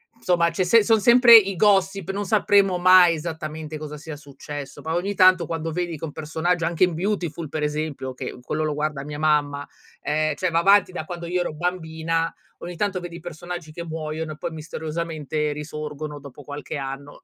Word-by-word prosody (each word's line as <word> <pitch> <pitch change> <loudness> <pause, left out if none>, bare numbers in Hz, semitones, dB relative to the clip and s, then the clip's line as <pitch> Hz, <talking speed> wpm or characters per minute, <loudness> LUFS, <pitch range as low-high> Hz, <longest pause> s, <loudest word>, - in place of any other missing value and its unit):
insomma 175 -6 +1
c'è 185 - -1
sem 220 +5 +5
son 220 +1 +3
sempre 235 +1 +8
i 195 -3 +2
gossip, 195 -2 +2
non 205 +1 -3
sapremo 200 -2 +3
mai 185 -1 +7
esattamente 155 -1 -6
cosa 150 0 -7
sia 150 +1 -8
successo, 145 -1 -9
ba 160 +1 -3
ogni 190 +4 -1
tanto 185 -3 +5
quando 165 0 -4
vedi 175 0 -3
che 160 - -5
un 150 - -7
personaggio 165 +3 -1
anche 170 +2 +3
in 175 - -4
Beautiful 170 -4 -2
per 155 0 -4
esempio, 150 -3 -3
che - - -6
quello 155 +5 -2
lo 155 -1 -1
guarda 150 -2 -2
mia 150 0 -7
mamma, 145 -2 +1 0.4
ehm, 155 +1 0
cioè 185 - -1
va 165 0 +2
avanti 195 +1 +5
da 160 -3 -5
quando 175 0 -7
io 180 +1 0
ero 165 - -3
bambina, 165 -1 -2 0.3
ogni 175 0 -7
tanto 195 0 -1
vedi 175 -1 -8
i - - -10
personaggi 175 0 -7
che 170 - -6
muoiono 160 -1 -5
e 150 - -13
poi 170 +1 -4
misteriosamente 155 -1 -4
risorgono 150 0 -6
dopo 140 +1 -12
qualche 145 +2 -6
anno. 135 +1 -7
160 Hz, 195 wpm, -23 LUFS, 150-180 Hz, 0.4 s, sempre